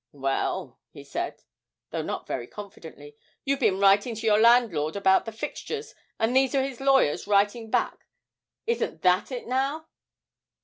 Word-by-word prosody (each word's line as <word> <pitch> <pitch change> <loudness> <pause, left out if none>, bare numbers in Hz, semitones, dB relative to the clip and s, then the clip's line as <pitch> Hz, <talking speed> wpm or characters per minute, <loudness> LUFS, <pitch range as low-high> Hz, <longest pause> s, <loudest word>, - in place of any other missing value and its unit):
Well,' 135 -1 -2
he - - -12
said, - - -5 0.5
though - - -2
not - - -5
very 120 - -4
confidently, 160 -8 -11 0.3
'you've 275 0 0
been 205 -7 +2
writing 200 +4 +4
to 225 +1 -6
your 210 -1 +4
landlord 220 -10 +4
about 190 -1 +3
the 225 - -5
fixtures, 430 - -6 0.2
and 225 +3 0
these 265 0 +3
are 270 - +3
his 270 -2 -5
lawyers 270 - +3
writing 205 +3 +2
back - - -1 0.6
isn't 465 +1 -2
that 180 +6 +3
it 250 -2 -5
now?' 275 +5 -1
225 Hz, 150 wpm, -26 LUFS, 190-265 Hz, 0.6 s, writing